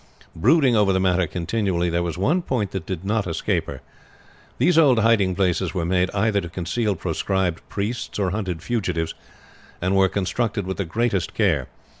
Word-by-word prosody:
Brooding 130 - +4
over 105 -2 +4
the 95 - +2
matter 90 -2 +2
continually, 90 0 -1
there 85 0 0
was 85 0 -3
one 150 - +2
point 115 - -2
that 95 -4 -5
did 95 -1 -4
not 105 -1 0
escape 80 - -1
her. - - -7 0.8
These 180 - +3
old 145 -7 +5
hiding 105 -5 +3
places 95 -1 0
were 85 -3 -1
made 90 +1 +1
either 100 0 +1
to 85 - -7
conceal 95 +5 -1
proscribed 95 0 -1
priests 110 +5 -3
or 95 -3 0
hunted 95 -5 -3
fugitives, 90 -9 -1 0.7
and 90 +2 0
were 95 -1 +4
constructed 100 +1 -1
with 95 0 -4
the 100 - -2
greatest 100 -1 -1
care. 80 - +1
95 Hz, 175 wpm, -23 LUFS, 90-110 Hz, 0.8 s, old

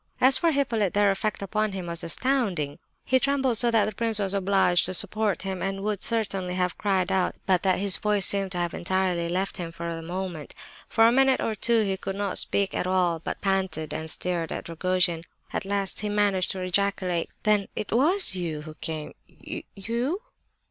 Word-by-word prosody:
As 260 +1 +6
for 335 +4 +3
Hippolyte, 230 - 0
their 205 -1 +4
effect 200 +1 -2
upon 215 +1 -1
him 185 -2 -4
was 170 -1 -5
astounding. 190 - -1 0.3
He 260 - +3
trembled 265 -4 +1
so 240 - +5
that 225 -3 +3
the 215 - -3
prince 225 +1 +2
was 200 -2 +1
obliged 195 -2 +3
to 185 - -2
support 210 0 0
him, 190 -2 -4
and 195 0 -2
would 210 -2 -1
certainly 195 -5 -1
have 180 -1 0
cried 190 -2 0
out, 190 -1 +1
but 185 -2 +3
that 185 -2 +2
his 195 0 +3
voice 210 -2 +1
seemed 195 -1 -1
to - - -3
have 175 -1 -1
entirely 180 -2 0
left 190 +3 -1
him 170 -3 -5
for 170 0 -5
the 165 - -6
moment. 175 -2 -5 0.3
For 225 - +4
a - - +5
minute 265 +1 +4
or 225 - -1
two 225 +2 +2
he 195 -2 -1
could 195 0 -5
not 200 -1 -1
speak 200 -1 0
at - - -1
all, 180 -3 +2
but - - -5
panted 190 -6 -1
and 160 +1 -4
stared 170 -1 0
at - - -5
Rogojin. 170 0 0 0.3
At - - -2
last 195 -1 -1
he 210 - -2
managed 205 -3 +1
to 190 - -5
ejaculate: 185 -2 0
"Then 210 -2 +3
it 210 - -4
was 315 - +3
you 165 -4 -3
who 155 0 -9
came—you—_you? 220 - -5
195 Hz, 195 wpm, -26 LUFS, 180-215 Hz, 0.3 s, As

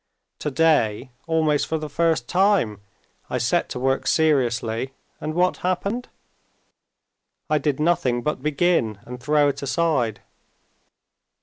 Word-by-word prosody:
Today, 150 -7 +1 0.2
almost 155 -3 +1
for 160 - -1
the 155 -1 -5
first 160 -4 0
time, 180 - +2 0.5
I - - -1
set - - 0
to - - -5
work 135 +1 0
seriously, 130 -5 +1 0.3
and 155 +1 -4
what 180 +1 +2
happened? 200 +7 -2 1.4
I 155 - +3
did 145 -2 -1
nothing 135 -7 +1
but 150 -3 -2
begin 150 - +1
and 125 0 -8
throw 145 +2 +3
it 140 - -2
aside. 140 -6 0
150 Hz, 120 wpm, -23 LUFS, 125-165 Hz, 1.4 s, I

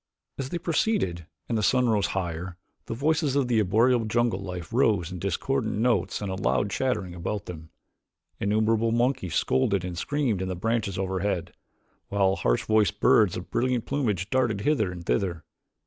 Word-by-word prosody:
As 135 -1 -3
they 175 - -2
proceeded 160 - 0 0.2
and 120 - -1
the 110 - +1
sun 125 +4 +3
rose 105 -3 +2
higher, 90 0 -4 0.3
the - - -3
voices 150 +1 +1
of 140 -3 +2
the 120 -3 +2
arboreal 115 +4 +3
jungle 115 -2 +1
life 90 -3 -7
rose 105 -8 +2
in 90 - -6
discordant 110 +6 -1
notes 105 -4 +1
and 95 -1 -3
loud 100 +1 +1
chattering 105 -7 -1
about 95 +4 -4
them. 80 -2 -9 0.7
Innumerable 110 +2 +2
monkeys 120 - 0
scolded 95 +8 +1
and 90 -1 -5
screamed 120 0 -1
in 95 - -2
the 95 - -3
branches 110 0 -1
overhead, 95 -2 -2 0.5
while 95 -1 +2
harsh - - +1
voiced 110 -1 +2
birds 105 -4 +4
of 90 - -8
brilliant 125 -1 0
plumage 110 - -1
darted 120 -6 +1
hither 110 -7 +1
and 85 -1 -8
thither. 85 -5 -1
105 Hz, 165 wpm, -26 LUFS, 90-120 Hz, 0.7 s, birds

